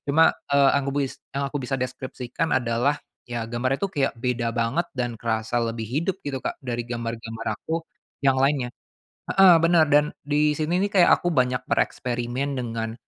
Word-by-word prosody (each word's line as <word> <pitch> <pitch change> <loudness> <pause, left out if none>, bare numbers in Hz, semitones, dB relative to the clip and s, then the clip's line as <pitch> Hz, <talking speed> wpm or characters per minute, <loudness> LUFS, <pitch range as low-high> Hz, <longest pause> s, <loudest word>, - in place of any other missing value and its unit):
Cuma, 160 +3 +5 0.2
eee, 140 -1 +5
angubuis 140 -1 -1 0.2
yang 140 0 0
aku 145 - -1
bisa 135 +2 -2
deskripsikan 130 +3 -3
adalah 125 +3 +1 0.3
ya 120 -1 -3
gambarnya 120 +3 -1
itu 200 - 0
kayak 140 -5 +1
beda 120 -1 -1
banget 120 +9 0
dan 120 -1 -1
kerasa 110 +1 -1
lebih 115 -1 -3
hidup 165 - -1
gitu, 135 -2 -2
Kak, - - -3
dari 120 -1 -2
gambar-gambar 115 -1 -4
aku 165 +1 -3 0.4
yang 135 -1 +4
lainnya. 135 -3 +2 0.6
Heeh, 195 -2 +7
benar 165 -1 +5
dan 150 +1 +4
di 150 +1 +2
sini 160 +4 0
nih 205 - -4
kayak 175 - +6
aku - - -2
banyak 125 -3 +2
bereksperimen 125 +3 -1
dengan, 115 -1 -3
130 Hz, 165 wpm, -24 LUFS, 120-145 Hz, 0.6 s, Heeh